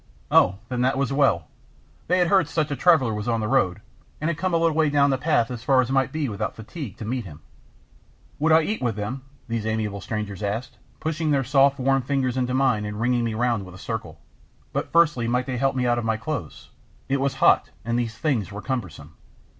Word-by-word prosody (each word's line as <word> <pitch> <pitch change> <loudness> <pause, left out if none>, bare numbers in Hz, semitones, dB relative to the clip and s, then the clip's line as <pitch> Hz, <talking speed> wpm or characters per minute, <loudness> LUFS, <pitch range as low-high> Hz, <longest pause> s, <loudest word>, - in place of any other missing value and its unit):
"Oh, 95 - +5
then 125 -1 -2
that 130 +2 +2
was 135 0 0
well. 135 - +2 0.6
They 180 - +3
had 175 -2 +2
heard 195 0 +4
such 155 -3 -1
a - - 0
traveller 140 -9 +4
was 105 +1 -4
on 115 -1 +1
the 110 - -2
road, 105 -7 +1 0.4
and 155 +3 0
had 160 - -5
come 185 +1 0
a 170 - +3
little 165 -1 +2
way 155 -2 +3
down 140 -1 +3
the 135 - +1
path, 130 -6 +1
as 120 -2 -6
far 135 0 +4
as 130 0 +1
might 135 -2 +2
be 155 -2 -2
without 105 -3 -3
fatigue, 110 - -8
to 110 - -7
meet 125 +2 -2
him." 80 -4 -11 1.0
"Would 160 +2 +2
I 160 0 +6
eat 215 +6 -2
with 120 -4 0
them?" 110 +6 -4 0.3
these 115 -2 -2
amiable 105 -2 -2
strangers 105 -3 -4
asked, 105 +4 -4 0.2
pushing 160 0 -2
their 140 -2 +2
soft 135 +2 +3
warm 135 +1 +2
fingers 130 -1 -1
into 125 -1 0
mine 130 -6 +2
and 105 0 -5
ringing 120 +1 +1
me 115 -2 -2
round 120 -2 0
with 90 -1 -11
a - - -11
circle. - - -6 0.5
"But - - -2
firstly 150 -8 +3
might 125 +2 0
they 130 -2 -3
help 135 +1 +1
me 125 -1 0
out 120 -1 +2
of - - -4
my 110 0 0
clothes? 115 - -6 0.4
It 135 0 0
was 135 -1 0
hot, - - +4 0.2
and 115 +1 0
these 115 -2 -3
things 120 - -1
were 105 +1 -7
cumbersome." 90 - -5
125 Hz, 230 wpm, -24 LUFS, 110-140 Hz, 1.0 s, I